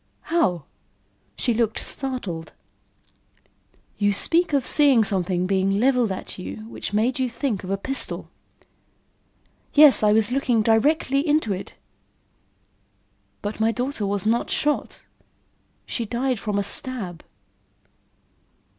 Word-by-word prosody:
"How?" 180 - +1 0.7
She 245 - +1
looked 225 -1 0
startled. 210 -12 -5 1.5
"You 205 -1 +2
speak 335 - +2
of 280 -3 +1
seeing 275 -6 +4
something 185 -3 0
being 195 +1 +1
leveled 250 -3 +2
at 190 - -6
you 215 +4 -7
which 230 - -6
made 230 +5 0
you 255 -1 0
think 235 -4 -3
of 185 - -7
a 195 - 0
pistol." 270 +7 -3 1.5
"Yes, 295 -2 +8
I 210 -1 +4
was 220 +2 +2
looking 250 -4 +1
directly 270 +5 +2
into 295 -8 +2
it." 190 - -7 1.7
"But 205 +2 -4
my 220 +1 +2
daughter 245 -2 -3
was 200 -1 -2
not 230 +2 +1
shot. 295 0 -1 0.8
She 235 - -4
died 250 +1 -1
from 210 -1 -2
a 200 - +1
stab." 200 -5 -3
225 Hz, 120 wpm, -23 LUFS, 200-265 Hz, 1.7 s, Yes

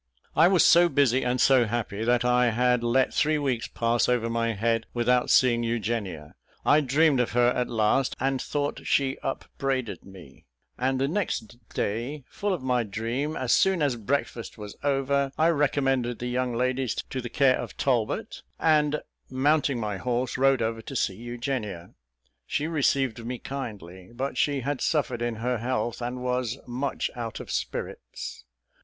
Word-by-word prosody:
I 165 +3 +6
was 185 -2 +5
so 175 0 +6
busy 135 -3 +3
and 125 0 0
so 130 -2 +5
happy, 110 -2 -3
that 120 +1 +2
I 125 0 +4
had 125 +1 +2
let 125 +2 +2
three 155 0 +2
weeks 130 -5 -1
pass 115 +1 +1
over 115 -2 +1
my 115 0 0
head 115 +2 0
without 125 +1 +2
seeing 120 -2 +4
Eugenia. 105 -9 -3 0.3
I 150 - +5
dreamed 145 +1 +3
of 120 -2 0
her 120 0 +4
at 125 0 -1
last, 115 +3 +1
and 135 0 0
thought 145 0 -3
she 135 -1 +1
upbraided 135 -3 -3
me; 95 -2 -14 0.3
and 130 +1 0
the 135 - +1
next 150 - -2
day, 120 +8 -3
full 205 0 -2
of 175 -8 -2
my 125 -1 +2
dream, 115 +8 -3
as 125 -2 +1
soon 190 -5 +3
as 140 -4 +1
breakfast 120 0 -3
was 105 -1 -8
over, 140 0 +1
I 160 +2 +4
recommended 135 -5 +1
the 125 - -5
young 125 0 -1
ladies 130 0 0
to 130 - -4
the 120 - -6
care 130 +1 +3
of - - -7
Talbot, 120 -5 -1 0.2
and, 150 -2 +2 0.3
mounting 140 0 +2
my 105 -3 -2
horse, 125 +2 -1
rode 135 -2 +3
over 115 0 -2
to 135 - -8
see 100 - +1
Eugenia. 120 -5 -5 0.5
She 150 - -1
received 135 -7 0
me 125 +2 -4
kindly, 100 -10 -7
but 135 +3 -3
she 145 -2 +1
had 140 +1 -2
suffered 140 -7 0
in 120 -1 -1
her 120 +2 -1
health, 120 0 -2
and 125 +1 -4
was 125 -1 -1
much 130 +3 -2
out 115 -2 -5
of - - -8
spirits. - - -5
125 Hz, 170 wpm, -26 LUFS, 115-135 Hz, 0.5 s, I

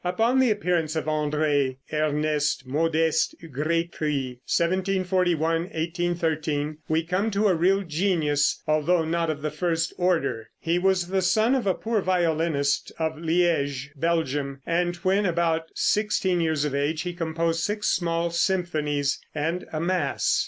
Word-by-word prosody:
] - - -38
Upon 225 +8 +2
the 260 -2 +4
appearance 175 -6 0
of 160 - -1
André 150 -3 0 0.2
Ernest 150 -2 0
Modest 160 +3 +1
Grétry, 150 -4 -2
(1741 180 -2 +1
1813), 160 -3 -2
we 160 +1 +2
come 185 +6 0
to 210 0 0
a 190 - +4
real 190 +4 +2
genius, 155 -4 +1
although 155 +2 +2
not 165 0 0
of 150 -2 -3
the 155 - -1
first 165 0 -1
order. 165 -11 0
He 170 +2 0
was 185 -1 +1
the 190 0 +1
son 215 +7 +3
of 255 -6 0
a 190 - +2
poor 225 -2 -1
violinist 165 -6 0
of 160 -1 -2
Liege, 160 -5 0
Belgium, 145 -3 -1
and 175 +1 0
when 195 +2 +2
about 165 -1 0
sixteen 200 -4 +1
years 160 -3 +1
of 145 - -2
age 150 +3 0
he 180 -1 -4
composed 165 -1 -1
six 210 +4 -1
small 170 -1 0
symphonies 155 -6 0 0.2
and 165 +4 -2
a 155 - -2
mass. 170 -3 +1
165 Hz, 145 wpm, -25 LUFS, 150-180 Hz, 0.2 s, the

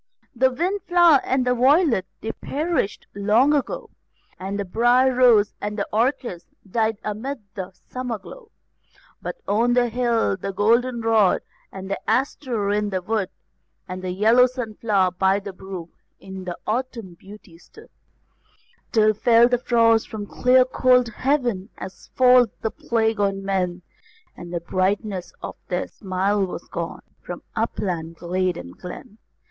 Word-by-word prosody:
The 260 +2 +4
wind 355 +10 -1
flower 345 -5 +6
and 260 -1 0
the 250 - +3
violet, 255 - +3
they 225 - -3
perished 305 - -2
long 215 +8 +3
ago, 300 - -2 0.5
And 195 +2 -4
the 200 - -2
brier 240 +6 +3
rose 240 -5 +5
and 210 +1 -4
the 200 - -2
orchis 230 -6 -1 0.2
died 220 +2 0
amid 225 +5 -4
the 190 -2 -6 0.2
summer 250 -3 -4
glow; 440 - -13 0.7
But - - -5
on 235 +4 +2
the 245 -1 +3
hill 235 -4 +1
the 195 +1 -5
goldenrod, 225 -1 +2 0.3
and 190 0 -8
the 195 - -3
aster 240 -4 0
in 210 0 0
the 185 -2 -3
wood, 210 -1 -1 0.6
And 185 0 -6
the 185 - -3
yellow 225 +7 +5
sunflower 215 -6 0
by 190 +1 +3
the 200 -1 -8
brook 185 -3 -8 0.3
in 190 -1 -7
autumn 230 -4 -3
beauty 190 -1 -15
stood, 440 - -17 1.0
Till 215 -2 +4
fell 230 +2 +5
the 245 -1 +1
frost 230 -2 +3
from 215 -2 -5
the - - -18
clear 255 0 +5
cold 250 -1 +3
heaven, 240 -6 -1
as 190 0 -9
falls 250 -1 +6
the 220 - -1
plague 225 -2 0
on 195 -1 0
men, 180 -2 -1 0.5
And 175 0 -10
the 170 -1 -3
brightness 190 +1 -1
of - - -6
their 180 0 -2
smile 195 +1 -1
was 185 - -5
gone, - - -5 0.2
from - - -8
upland, 180 -7 -2
glade, 180 +1 -1
and 85 +1 -9
glen. 190 +4 -10
220 Hz, 150 wpm, -23 LUFS, 190-250 Hz, 1.0 s, flower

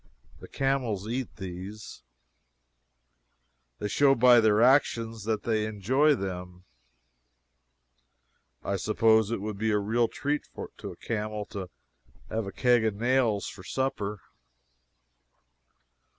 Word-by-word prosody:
The - - -11
camels 125 -7 -1
eat 125 +1 -4
these. 95 - -8 1.8
They 105 - -3
show 135 +6 +4
by 125 0 +6
their 110 -2 +3
actions 115 -4 +2
that 110 -1 -1
they 110 -2 0
enjoy 130 +9 +2
them. 90 -3 -6 2.0
I 100 - -1
suppose 110 +2 +3
it 115 -4 -2
would 105 -1 -5
be 110 +1 0
a 105 - +2
real 115 +3 +1
treat 145 +5 -3 0.3
to - - -6
a - - -11
camel 105 -2 -4
to 95 -3 -6 0.6
have 110 -2 -2
a - - -5
keg 125 -1 +3
of 110 -2 0
nails 120 -2 +1
for 90 - -9
supper. 105 -4 -3
110 Hz, 120 wpm, -28 LUFS, 100-120 Hz, 2.0 s, by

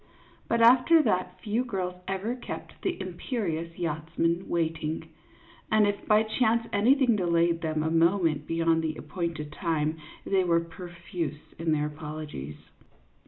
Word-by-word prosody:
But 230 0 +1
after 255 +7 +7
that 185 -3 0
few 220 +5 0
girls 190 -7 -3
ever 195 +5 -2
kept 250 - -8
the 365 -2 -2
imperious 175 - -3
yachtsman 165 +1 -1
waiting; 160 -2 -1 0.6
and 215 -1 +5
if 205 0 -2
by 215 +1 +5
chance 230 +1 +1
anything 245 +4 +4
delayed 170 -3 +2
them 155 -1 -1
a 160 - 0
moment 165 -3 +2
beyond 165 0 +2
the 155 -1 -2
ap 150 - -11
pointed 170 -4 -3
time, 155 -1 -1 0.3
they 195 -1 +2
were 170 -2 +3
profuse 170 -2 -6
in 165 -1 0
their 150 -1 +1
apologies. 150 - -6
170 Hz, 140 wpm, -28 LUFS, 160-205 Hz, 0.6 s, after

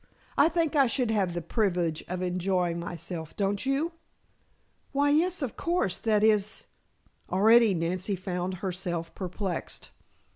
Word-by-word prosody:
I 295 - +5
think 330 -3 0
I 275 -3 +5
should 240 -1 0
have 190 -5 0
the 175 - -3
privilege 175 -5 0
of 180 0 -3
enjoying 180 -1 0
myself, 170 -1 -6
don't 200 0 0
you?" 285 +5 +1 1.0
"Why, 285 +1 +3
yes, 335 +2 +2
of 255 - -3
course. 340 - 0
That 215 -2 +2
is 215 -1 +2 0.3
" - - -33
Already 220 +2 +5
Nancy 180 +4 -1
found 185 0 -3
herself 175 -2 -3
perplexed. 185 -1 -4
195 Hz, 140 wpm, -28 LUFS, 180-235 Hz, 1.0 s, I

